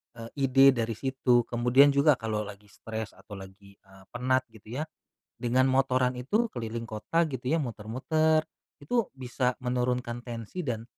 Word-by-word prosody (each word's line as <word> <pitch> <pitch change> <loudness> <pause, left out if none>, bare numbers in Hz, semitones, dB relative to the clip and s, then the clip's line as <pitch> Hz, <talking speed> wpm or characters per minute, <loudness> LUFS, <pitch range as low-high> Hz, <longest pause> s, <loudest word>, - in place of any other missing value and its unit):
eee, 115 0 -8 0.2
ide 135 +1 +7
dari 115 -3 -2
situ. 130 -2 +2
Kemudian 125 +4 +4
juga 140 +1 +4
kalau 110 -3 -3
lagi 105 0 -12
stres 110 -1 -6
atau 105 - -12
lagi, 95 +1 -13
eee, 95 -1 -19
penat 130 +1 +1
gitu 110 +4 -9
ya, - - 0 0.6
dengan 130 +2 +2
motoran 130 -1 +2
itu 215 - 0
keliling 115 -1 -5
kota 115 +10 -1
gitu 125 -1 -5
ya 150 - +2
muter-muter, 135 +8 0 0.4
itu 230 +7 0
bisa 125 -1 -1
menurunkan 125 -1 -1
tensi 120 - -6
dan 115 -2 -2
125 Hz, 155 wpm, -28 LUFS, 110-135 Hz, 0.6 s, ide